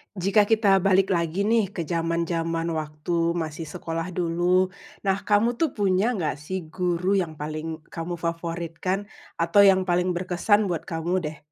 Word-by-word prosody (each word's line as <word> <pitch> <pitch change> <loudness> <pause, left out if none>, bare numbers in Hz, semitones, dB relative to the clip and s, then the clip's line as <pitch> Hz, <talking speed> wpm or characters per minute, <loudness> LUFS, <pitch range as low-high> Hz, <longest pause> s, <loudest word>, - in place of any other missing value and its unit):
Jika 200 +3 +3
kita 210 -4 +4
balik 195 +1 +3
lagi 170 +2 0
nih 225 -1 +2
ke 170 - -2
zaman-zaman 165 0 -1
waktu 160 +2 -1
masih 160 -1 -4
sekolah 165 0 -4
dulu. 180 +2 +2 0.3
Nah, 195 -1 +2
kamu 230 +4 +2
tuh 320 -5 0
punya 205 +3 +2
gak 155 -7 -2
sih 185 +5 -4
guru 180 +1 0
yang 165 -4 -3
paling 155 +1 -5
kamu 170 +1 -4
favoritkan? 170 +3 -3 0.3
Atau 195 +4 +5
yang 190 -1 +5
paling 180 0 +1
berkesan 185 +3 +1
buat 165 - -4
kamu 165 +1 -2
deh? 155 - -7
175 Hz, 150 wpm, -25 LUFS, 165-195 Hz, 0.3 s, Atau